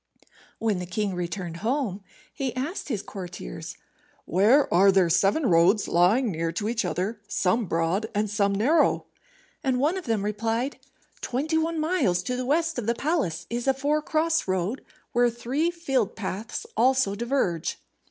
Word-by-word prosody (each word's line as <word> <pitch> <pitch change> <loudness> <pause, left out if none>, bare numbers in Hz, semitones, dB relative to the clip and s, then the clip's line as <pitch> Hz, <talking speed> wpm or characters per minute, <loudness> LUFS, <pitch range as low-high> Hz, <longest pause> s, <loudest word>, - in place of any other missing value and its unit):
When 215 -4 0
the 180 - -5
king 205 +1 -1
returned 175 -1 -4
home, 220 -1 -1 0.3
he 265 -3 -3
asked 295 +7 -4
his 215 -7 -2
courtiers, 175 - -7 0.5
"Where 215 - +4
are 195 +3 +6
there 185 -3 +3
seven 195 - +3
roads 185 +2 +4
lying 205 +8 +3
near 165 0 -2
to 205 +5 -2
each 230 0 0
other, 185 +5 -2
some 205 +5 +1
broad, 165 +6 0
and 210 +1 +1
some 200 -1 +1
narrow?" 265 +12 +3 0.6
And 260 -3 +1
one 310 +8 +2
of 370 - -11
them 220 -4 0
replied, 225 +5 -1 0.4
"Twenty 310 +6 0
one 325 0 -1
miles 310 - +1
to 250 - -2
the 250 0 -3
west 325 0 +1
of 225 - -5
the 235 - +2
palace 215 - -1
is 240 +2 -2
a 270 - +4
four 290 +3 +1
cross 320 -1 0
road, 190 +6 -1 0.3
where 245 0 +3
three 255 +8 -1
field 270 - -1
paths 210 +2 -5
also 255 -3 +3
diverge." 225 - -1
225 Hz, 160 wpm, -26 LUFS, 190-270 Hz, 0.6 s, are